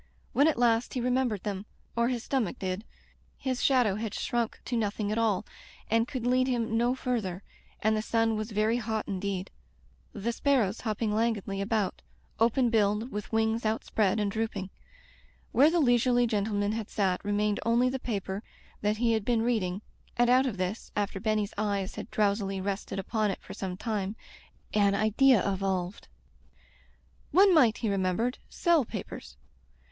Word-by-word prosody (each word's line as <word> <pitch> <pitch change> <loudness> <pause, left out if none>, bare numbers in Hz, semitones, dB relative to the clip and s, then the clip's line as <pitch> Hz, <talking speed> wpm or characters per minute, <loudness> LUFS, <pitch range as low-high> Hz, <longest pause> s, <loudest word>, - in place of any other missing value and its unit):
When 285 +3 +5
at 320 - +2
last 235 0 +2
he - - 0
re 250 +1 0
membered 245 -6 0
them 200 0 -4
— - - -37
or 235 0 +2
his 245 -2 -2
stomach 255 -9 -1
did 190 +3 -3 0.3
— - - -29
^his 255 -1 0
shadow 245 -7 +3
had 220 -2 -4
shrunk 235 -2 -1
to 245 - -2
nothing 210 -2 -1
at 220 - 0
all, 215 -3 +1 0.5
and 230 +1 +3
could 255 -3 -4
lead 255 +1 +3
him 230 -3 0
no 240 +2 +2
further, 210 -8 -2 0.4
and 220 +1 +3
the 215 - 0
sun 225 0 +1
was 215 +1 -3
very 215 +2 +1
hot 220 -2 -2
indeed 195 -1 -3 0.3
— 60 0 -34
the 230 +4 -2
sparrows 235 -5 +1
hopping 215 -1 -1
lan 230 +2 +2
guidly 195 -1 -5
about, 205 -1 -1 0.4
open 235 +2 +3
billed, 215 +2 +1
with 210 0 -5
wings 225 +1 +1
out 220 +1 0
spread 215 -1 +1
and 205 -1 0
drooping. 205 -3 -3 0.8
Where 285 +4 +6
the 340 +1 +2
leisurely 245 -2 +4
gentleman 205 -2 0
had 220 -1 -4
sat 190 -3 0
remained 205 0 0
only 235 +3 +3
the 265 +1 -1
paper 200 -4 -3 0.4
that 210 +1 +1
he 230 0 +2
had 220 -2 0
been 230 0 +1
reading, 210 -5 0 0.3
and 240 0 +4
out 260 +2 +5
of 215 -6 -3
this, 185 +4 -3
after 200 -1 -1
Benny's 215 0 0
eyes 200 -3 -1
had - - -7
drowsily 200 -2 0
rested 195 +1 -3
upon 215 +2 0
it 195 - -3
for - - -9
some 185 -2 -5
time, 210 -2 -2 0.6
an 200 -1 +3
idea 220 +3 +4
evolved. 190 -1 -2 1.2
One 385 +1 +6
might, 245 -9 +5
he 230 - -2
remembered, 195 +6 0
sell 340 -5 +3
papers. 65 - -8
220 Hz, 175 wpm, -29 LUFS, 200-240 Hz, 1.2 s, Where